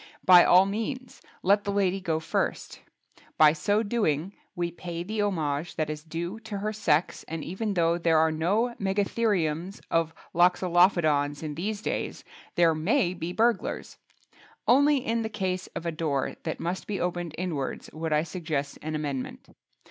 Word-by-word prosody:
By 180 -1 +9
all 185 +2 +6
means 230 +6 -4 0.2
let 200 +2 +4
the 200 - -2
lady 195 -1 +1
go 160 -4 0
first; 160 - -2 0.6
by 150 -1 +7
so 205 +8 +1
doing 200 -6 0 0.2
we 175 -1 -2
pay 170 0 -6
the 215 +3 -2
homage 160 -5 -1
that 155 -1 -1
is 150 0 -7
due 170 +6 -5
to 220 -2 -6
her 210 +2 -2
sex 165 -6 +1
and 160 -1 -5
even 200 +4 -3
though 170 0 +2
there 165 -1 +3
are 160 0 +4
no 200 +10 +1
Megatheriums 195 -3 0
of 165 -1 +1 0.2
Loxolophodons 175 -5 +3
in 150 -1 -4
these 205 +7 -4
days—there 170 -2 -1
may 180 - +1
be 170 -1 -5
burglars! 225 +2 0 0.7
Only 285 +4 +5
in 230 -3 -1
the 220 - -3
case 185 -3 -2
of 170 - -5
a 170 - 0
door 155 -4 -1
that 160 - -3
must 175 +2 -3
be 200 -3 -2
opened 175 -2 -3
inwards 160 -7 -4
would 160 0 -4
I 150 0 +3
suggest 155 -4 -4
an 155 0 -4
amendment. 145 -4 -4
175 Hz, 160 wpm, -27 LUFS, 160-205 Hz, 0.7 s, By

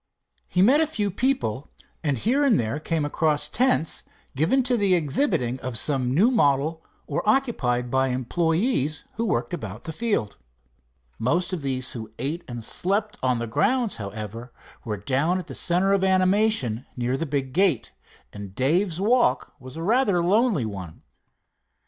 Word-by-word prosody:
He 180 - +2
met 275 +9 +5
a 320 - +2
few 210 -10 -2
people 200 - -1 0.3
and 145 -4 0
here 255 - +1
and 255 -8 +4
there 115 +6 -2
came 160 -1 -1
across 150 0 +1
tents 240 -3 +1 0.3
given 165 - +2
to 250 0 +1
the 200 -5 +3
exhibiting 140 - 0
of 125 -3 -3
some 130 -3 0
new 195 - +4
model, 155 - +1 0.2
or 145 - -2
occupied 125 - 0
by 130 0 +2
employees 160 - 0
who 230 - -2
worked 120 - -1
about 110 +1 -6
the 160 - -6
field. 205 - -2 0.8
Most 175 +10 0
of 175 - -3
those 130 -2 -1
who 110 -3 -7
ate 150 +7 -2
and 120 -2 -6
slept 205 - 0
on 125 -1 +1
the 120 - -3
grounds, 235 - 0
however, 110 +3 -7 0.3
were 105 -2 -4
down 140 - 0
at 185 - -5
the - - -9
center 185 +3 +3
of 195 -1 +1
animation 185 - +1
near 125 +1 -1
the 165 +4 -3
big 135 -2 -2
gate, 180 - +2 0.4
and 100 -2 -9
Dave's 165 - +1
walk 210 - +2
was 130 +2 -11
a 165 - -4
rather 215 -2 +2
lonely 200 - +2
one. 95 -6 -8
155 Hz, 160 wpm, -24 LUFS, 125-200 Hz, 0.8 s, met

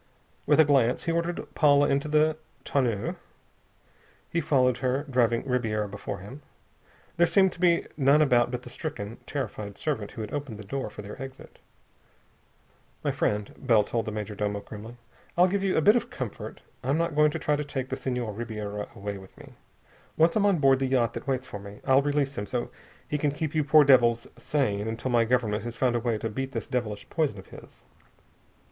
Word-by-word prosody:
With - - +4
a 160 - +8
glance, 130 -4 +3
he 165 - 0
ordered 170 +1 -1
Paula 145 -2 +5
into 140 +2 +1
the 155 +1 +3 0.3
tonneau. 120 -7 0 1.1
He 170 - +1
followed 125 -4 +3
her, 130 +2 0
driving 120 -3 +2
Ribiera 110 -5 0
before 100 0 -6
him. 125 +10 -10 0.8
There 175 +1 +5
seemed 190 0 +4
to - - -12
be 170 -2 +3
none 140 +1 +4
about 125 -5 +4
but 125 0 -4
the 125 - -10
stricken, 120 -7 -5
terrified 105 -7 -4
servant 120 -10 -2
who 115 - -6
had 105 - -6
opened 145 -7 -4
the 105 - -8
door 130 +3 -4
for 105 0 -9
their 105 +6 -9
exit. 135 0 -10 1.4
"My - - +1
friend," 105 -1 -1
Bell 115 -5 +4
told 115 +1 -2
the 110 - -3
major 105 0 -4
domo 105 0 -2
grimly, 110 +4 -10 0.4
"I'll 180 +1 +6
give 195 +2 0
you 195 -1 +1
a - - +4
bit 210 +8 +6
of 240 0 0
comfort. 125 - -6 0.2
I'm 135 +4 +1
not 170 -1 0
going 150 +1 +5
to - - -3
try 150 - +1
to 150 - -2
take 135 -3 -4
the 130 - -2
Senhor 125 -4 -3
Ribiera 105 -2 -5
away 100 -1 -5
with 95 0 -15
me. - - -13 0.6
Once 165 +1 +4
I'm 205 -1 +3
on 195 -3 +3
board 135 -3 +4
the 135 - 0
yacht 125 -4 +2
that - - -7
waits 130 -1 -1
for 105 - -7
me, 100 +1 -10
I'll 135 0 +5
release 145 -1 0
him 105 - -4
so 120 -1 -3 0.4
he 150 - -2
can 145 - +2
keep 150 +1 -3
you 155 -1 +2
poor 150 +1 +6
devils 120 -4 +5
sane 105 -8 -1
until 115 +3 -3
my 120 -1 +4
Government 110 -3 +1
has 120 0 -5
found 125 -2 +2
a - - +2
way 115 -1 0
to 115 - -3
beat 135 +5 -4
this - - -3
devilish 115 -6 -3
poison 155 -10 0
of 95 - -12
his. - - -14
130 Hz, 205 wpm, -27 LUFS, 110-145 Hz, 1.4 s, a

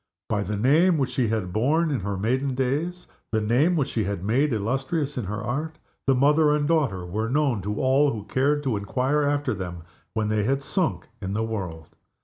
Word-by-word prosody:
By 105 -1 +1
the 105 +1 -2
name 155 - +4
which 135 -3 0
she 125 -3 +1
had 105 -5 -2
borne 150 - +2
in 135 - 0
her 100 +1 -3
maiden 130 +6 0
days 150 +8 -1 0.3
the 110 - +2
name 125 +11 +2
which 140 -4 0
she 110 - -1
had 100 -2 -3
made 130 +8 +2
illustrious 135 +7 -1
in 125 - -3
her 105 +3 -4
Art 150 +7 -3 0.3
the 135 - +5
mother 150 +3 +4
and 145 -1 0
daughter 135 - +1
were 110 +6 -2
known 135 -5 +1
to 105 +2 -3
all 135 +2 +3
who 110 -4 -5
cared 140 +7 +1
to 130 -6 0
inquire 130 +8 0
after 145 -2 +1
them 90 -4 -6 0.3
when 110 -1 0
they 110 0 +1
had 135 +6 0
sunk 185 +3 -1
in 95 0 -3
the 110 +2 0
world. 90 -8 -5
125 Hz, 205 wpm, -25 LUFS, 105-145 Hz, 0.3 s, the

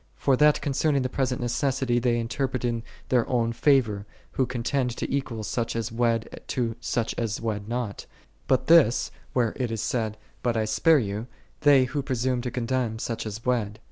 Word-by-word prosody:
For 130 - +2
that 150 +1 +5
concerning 140 -1 +1
the 130 - -1
present 130 -1 -1
necessity 125 0 0
they 120 -1 +1
interpret 125 +2 -2
in 115 -1 -1 0.3
their 125 -3 +2
own 115 -2 +1
favor, 115 -7 +2 0.2
who 130 - 0
contend 125 0 -1
to - - -3
equal 120 -5 -3
such 115 +2 -2
as 115 0 -2
wed 115 -1 0
to 115 -3 -1
such 115 -2 -1
as 115 -2 -2
wed 105 -3 -3
not: 120 -4 -3 0.4
but 130 - +2
this, 160 -8 +5 0.2
where 120 -4 +1
it 125 -3 -1
is 115 -2 -3
said, 110 -3 -1 0.2
"But 120 -2 0
I 110 - +1
spare 110 +10 +4
you," 105 -2 -2 0.3
they 145 -3 +6
who 140 +3 -2
presume 130 -1 -1
to 125 - -3
condemn 120 -2 -1
such 115 -1 -3
as 110 +2 -7
wed. 110 -5 0
120 Hz, 180 wpm, -26 LUFS, 115-130 Hz, 0.4 s, they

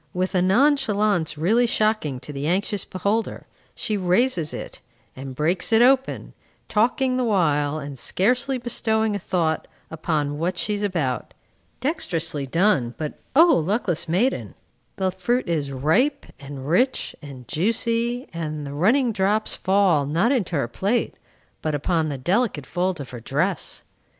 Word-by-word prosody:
With 185 +2 -1
a 180 - +2
nonchalance 210 - +2
really 220 +10 +3
shocking 215 - 0
to 150 - -8
the 140 +1 -3
anxious 195 +3 0
beholder, 205 +4 -2 0.3
she 215 - -2
raises 180 -2 +1
it, - - -7 0.4
and 130 0 -8
breaks 170 - +1
it 225 +1 +6
open, 265 +1 +2 0.3
talking 255 +4 +1
the 255 - +1
while, 155 -9 +1
and 140 -3 -7
scarcely 250 - +1
bestowing 220 -3 0
a - - -2
thought 170 -4 -1 0.2
upon 150 -2 -2
what 175 +2 -1
she 210 - 0
is 205 - -2
about. 165 -11 -2 0.5
Dexterously 165 - -1
done; 155 - +1
but 155 -2 -5 0.2
O 325 +4 +8 0.2
luckless 175 -3 -1
maiden! 210 +11 0 0.4
the 190 -1 0
fruit 240 +7 -1
is 150 -5 -1
ripe, 200 - +1
and 140 -1 -8
rich, 250 - +1
and 135 -5 -11
juicy, 230 - 0
and 155 -3 -4
the 140 - -6
running 230 - +3
drops 210 +1 0
fall, 190 -7 +2
not 170 - +2
into 205 -11 0
her 140 -5 0
plate, 200 - -1 0.5
but 155 -1 -1
upon 160 +2 0
the 140 - -4
delicate 175 - 0
folds 180 0 -1
of 140 - -7
her 125 - -7
dress. 150 - -2
185 Hz, 150 wpm, -23 LUFS, 150-225 Hz, 0.5 s, O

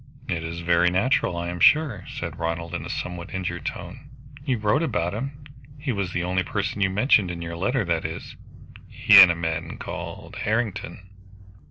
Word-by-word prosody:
"It 80 -1 -2
is 85 +1 -5
very 85 +1 +3
natural, 95 -1 +1
I 85 0 -3
am 90 0 -5
sure," 140 - +4
said - - -6
Ronald 85 0 -3
in - - -3
a - - -7
somewhat 90 -1 -5
injured 90 -2 -3
tone. - - -7 0.3
"You 130 -4 0
wrote 110 +8 +1
about 90 - -1
him. 135 +6 -5 0.3
He 140 -1 -3
was 100 -5 -2
the 90 -1 -2
only 90 +1 0
person 100 +3 -3
you 95 - +3
mentioned 100 -1 +3
in 85 -1 -5
your 85 0 -5
letter 120 +6 0
that 85 -2 0
is, 80 0 -6 0.5
he 100 -2 +7
and 90 - +9
a 85 - +1
man 80 -1 -3
called - - -7
Harrington." 110 -3 -2
90 Hz, 185 wpm, -24 LUFS, 85-105 Hz, 0.5 s, and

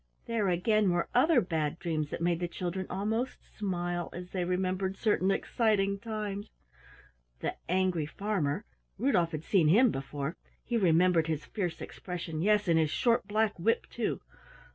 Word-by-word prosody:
There 225 -3 0
again, 200 +3 +2
were 175 -1 0
other 265 +2 +5
Bad 160 -4 -1
Dreams 155 -4 -2
that - - -5
made 170 -1 +1
the 175 - -1
children 180 +2 -4
almost 220 +6 -3
smile 175 -3 -2
as 180 +1 -8
they 185 -2 -1
remembered 185 +1 -1
certain 200 -4 +2
exciting 200 -2 +1
times. 210 -1 -4 0.9
The - - -2
Angry 180 -4 +1
Farmer 180 -6 -1 0.3
Rudolf 190 -8 +2
had 155 -1 -4
seen 175 -5 +3
him 225 +9 +6
before; 140 +3 -4 0.3
he 240 - -3
remembered 175 -4 +4
his 155 -1 -2
fierce 180 -4 -3
expression, 170 -3 -5
yes, 210 +1 +3
and 165 -1 +4
his 155 -2 +2
short 235 - +2
black 215 -2 +1
whip, 225 +7 +1
too! - - -2
185 Hz, 155 wpm, -30 LUFS, 170-210 Hz, 0.9 s, him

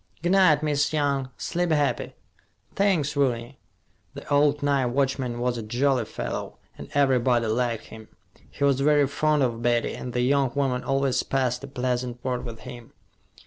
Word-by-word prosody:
"G' 175 - +1
night, 185 -6 +5
Miss 150 0 +1
Young. 140 -3 0
Sleep 175 0 -2
happy." 150 -3 0 0.6
"Thanks, 175 -8 +1
Rooney." 125 -2 -1 0.6
The - - -9
old 145 0 +3
night 140 -3 +2
watchman 130 -1 -1
was 120 -1 -1
a - - -4
jolly 125 +3 0
fellow, - - -5 0.2
and - - -10
everybody 125 -4 +3
liked 115 +1 -1
him. 110 -1 -11 0.4
He - - -5
was 140 -2 +3
very 145 0 +4
fond 150 +1 +1
of 120 -2 -1
Betty, 120 0 +1
and 125 - -6
the 125 0 -1
young 135 0 +2
woman 135 -3 0
always 135 -1 +1
passed 130 -1 -1
a - - -6
pleasant 125 -2 -2
word 125 -1 -2
with 115 -2 -8
him. 120 -2 -11
135 Hz, 165 wpm, -25 LUFS, 120-145 Hz, 0.6 s, night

